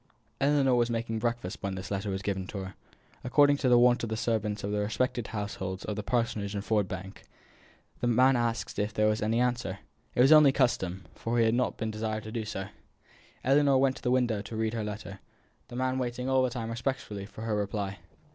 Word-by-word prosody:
Ellinor 140 -2 +3
was 120 -1 +3
making 115 -1 -2
breakfast 120 -5 -2
when 100 -1 -3
this 95 +1 -7
letter 100 +1 -2
was 95 0 -3
given 95 -2 -2
her. 95 -1 -5 0.5
According 145 +3 +4
to 135 -3 +1
the 120 - +6
wont 120 0 +5
of 115 - -3
the 110 - -2
servants 110 -2 -1
of 100 - -2
the 105 - 0
respective 110 +3 -1
households 100 -3 -4
of 105 - -3
the 105 - -3
Parsonage 105 -2 -1
and 100 +1 -4
Ford 105 -3 +1
Bank, 95 +1 -7 0.8
the 120 - 0
man 130 +3 +5
asked 120 -1 -1
if 105 +1 -1
there 105 - +3
was 110 0 +2
any 110 +2 +1
answer. 120 -6 0 0.4
It - - +4
was 135 +4 +6
only 150 -3 +8
custom; 95 -9 0
for 115 +1 -2
he 115 - +4
had 110 - +3
not 125 +1 0
been 110 -1 -2
desired 110 0 -3
to 110 - -7
do 110 -1 -3
so. 100 -2 -5 0.7
Ellinor 140 +1 +4
went 135 0 +3
to - - -12
the 125 - -1
window 120 -4 +2
to 110 - -8
read 110 0 -1
her 115 -2 -2
letter; 105 -2 -6 0.5
the 120 - -10
man 130 +1 0
waiting 125 0 -3
all 130 0 +3
the 130 - +2
time 115 -2 -4
respectfully 115 -5 -3
for 110 - -9
her 110 -2 -1
reply. 100 -1 -3
110 Hz, 220 wpm, -29 LUFS, 105-125 Hz, 0.8 s, only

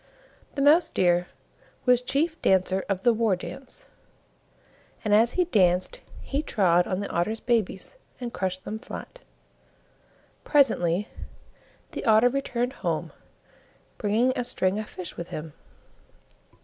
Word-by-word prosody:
The 275 - 0
Mouse 320 +3 +5
deer 175 - +2 0.6
was 250 -1 +4
Chief 315 +6 -1
Dancer 190 0 +2
of 190 -1 -1
the 240 - +5
War 220 -3 +2
dance, 255 - -9 1.2
and 210 - +2
as 225 +3 +4
he 360 - +2
danced 190 - +2 0.2
he 280 +2 -2
trod 180 - +2
on 185 +1 -2
the 200 - -4
Otter's 215 +7 -1
babies 225 - -1 0.2
and 245 -2 -5
crushed 185 0 -3
them 215 +1 -5
flat. - - -9 1.2
Presently 210 - +2 0.8
the - - -5
Otter 220 +2 +5
returned 250 -1 -2
home, - - -2 0.9
bringing 225 +5 +2
a 250 - -1
string 205 -5 0
of 215 - -6
fish 180 -2 -8
with 170 - -5
him. 155 0 -7
215 Hz, 130 wpm, -26 LUFS, 185-250 Hz, 1.2 s, Mouse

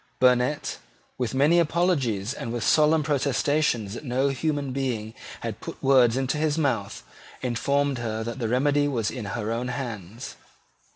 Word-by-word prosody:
Burnet, 125 +3 +2 0.4
with 125 -1 -1
many 150 +6 +4
apologies 145 - +1
and 115 - -5
with 120 -2 -3
solemn 155 0 +4
protestations 140 -6 +1
that 120 - -7
no 130 +1 +1
human 145 -1 -1
being 120 -5 -2 0.3
had - - -4
put - - -7
words 130 -3 +5
into 135 +3 -1
his 155 0 +1
mouth, 115 -10 -1 0.4
informed 140 +2 0
her 110 -1 -3
that 120 +3 -5
the 115 -3 -1
remedy 145 +4 +2
was 115 -6 -1
in 125 -5 -6
her 105 +2 -3
own 120 +2 -2
hands. 120 -4 -6
130 Hz, 155 wpm, -25 LUFS, 115-145 Hz, 0.4 s, words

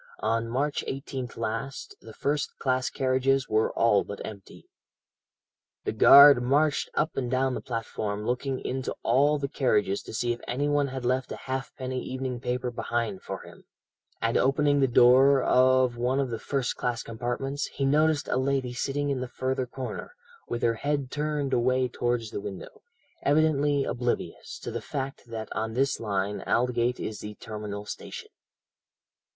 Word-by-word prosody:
on 115 +1 0
March 140 +5 -1
18th 135 -3 -5
last, 115 +4 -4
the 110 - -11
first 145 +5 -2
class 130 -1 0
carriages 135 0 +1
were 110 +1 +2
all 105 -3 +3
but 100 - -8
empty. 100 -3 -11 1.2
"The - - -1
guard 140 +4 +9
marched 145 +4 +2
up 155 - 0
and 125 -3 -2
down 130 +1 +1
the - - -4
platform 110 -3 -4
looking 130 +2 -1
into 130 0 -3
all 140 +5 +3
the 140 -1 -2
carriages 105 -8 +1
to - - -10
see 120 +2 0
if 120 - -10
anyone 145 +2 +1
had 130 -2 -5
left 130 +1 0
a - - -3
halfpenny 130 -1 -4
evening 130 -1 -4
paper 125 0 -2
behind 115 -3 -2
for - - -6
him, - - -15 0.5
and 115 0 +1
opening 145 +1 +3
the 135 - +4
door 130 +3 +6
of 130 -1 +4
one 125 +3 +1
of 135 -3 -1
the 115 - -3
first 135 0 -2
class 120 -1 -2
compartments, 120 +5 -3
he 135 - -3
noticed 150 +2 +2
a - - 0
lady 130 -1 0
sitting 140 +3 -1
in 135 - -1
the 130 - -3
further 130 0 -2
corner, 130 - -6 0.3
with 120 - -3
her 115 - +3
head 140 +2 -2
turned 150 -2 -1
away 130 +1 +2
towards 120 -2 -2
the - - -4
window, 95 -1 -8 0.4
evidently 145 -1 +2
oblivious 120 0 -3
of - - -4
the - - -3
fact 135 -2 -5
that 110 -2 -5
on 110 0 -2
this 135 +2 +1
line 100 -2 -2
Aldgate 125 0 +1
is 110 - -4
the 105 0 -7
terminal 105 -1 -6
station. - - -8
130 Hz, 165 wpm, -27 LUFS, 115-135 Hz, 1.2 s, guard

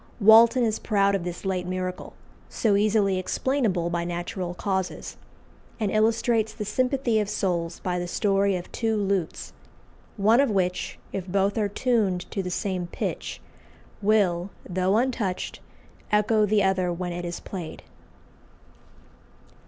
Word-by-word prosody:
Walton 230 +4 +7
is 220 -2 0
proud 200 -2 +2
of 195 -3 0
this 175 +2 -6
late 185 -2 -1
miracle, 185 0 -4 0.4
so 215 -4 +1
easily 200 -2 +2
explainable 190 -5 0
by 170 0 -1
natural 175 +1 -4
causes; 190 -1 -3 0.6
and 210 -3 0
illustrates 220 0 +2
the 210 - -4
sympathy 255 +1 +1
of 210 -1 -1
souls 170 -4 -1
by 180 -1 -1
the 175 - -3
story 195 +1 +1
of 180 0 -6
two 225 -2 0
lutes, 195 -4 -2 0.6
one 215 +4 +4
of 280 - +4
which, 180 -3 -1 0.2
if 190 -1 -4
both 195 +2 +1
are 210 -3 0
tuned 205 -5 +1
to 195 - -1
the 180 - -4
same 180 -1 -2
pitch, - - -4 0.6
will, 195 -4 +2 0.2
though 185 +3 +1
untouched, 235 -7 -1 0.5
echo 210 0 +3
the 205 0 +3
other 190 -2 +1
when 175 0 -3
it 175 0 -5
is 175 0 -4
played. 175 -5 -7
195 Hz, 140 wpm, -25 LUFS, 180-215 Hz, 0.6 s, Walton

